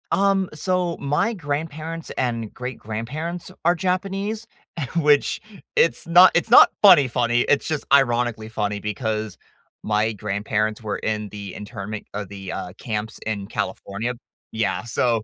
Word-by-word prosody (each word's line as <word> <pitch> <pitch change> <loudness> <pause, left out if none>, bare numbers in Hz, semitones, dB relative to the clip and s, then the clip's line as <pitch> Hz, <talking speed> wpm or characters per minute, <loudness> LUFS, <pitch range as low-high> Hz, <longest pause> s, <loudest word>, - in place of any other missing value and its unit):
Um, 195 -1 +2
so, 180 +2 -1
my 150 +12 +1
grandparents 160 -1 -4
and 115 -4 -2
great-grandparents 125 +8 -5
are 175 +2 +4
Japanese, 195 +4 -2 0.5
which 150 -3 +3 0.4
it's 165 - +3
not 175 +2 +8
it's 175 - +2
not - - +9
funny 180 -10 +8
funny, 120 0 +1
it's 145 - +2
just 155 -2 -2
ironically 120 -4 +2
funny, 105 -2 -2
because 110 -1 -3 0.5
my 110 +1 +1
grandparents 105 +1 -2
were 105 -1 -2
in 105 -1 -2
the 100 -2 -8
internment, 105 0 -6
uh, 105 0 -3
the, 95 -2 -7
uh, 90 - -5
camps 110 -1 -4
in 105 -3 -3
California. 110 +6 -3 0.4
Yeah, 100 -5 -1
so, 115 -1 0
120 Hz, 135 wpm, -23 LUFS, 105-165 Hz, 0.5 s, not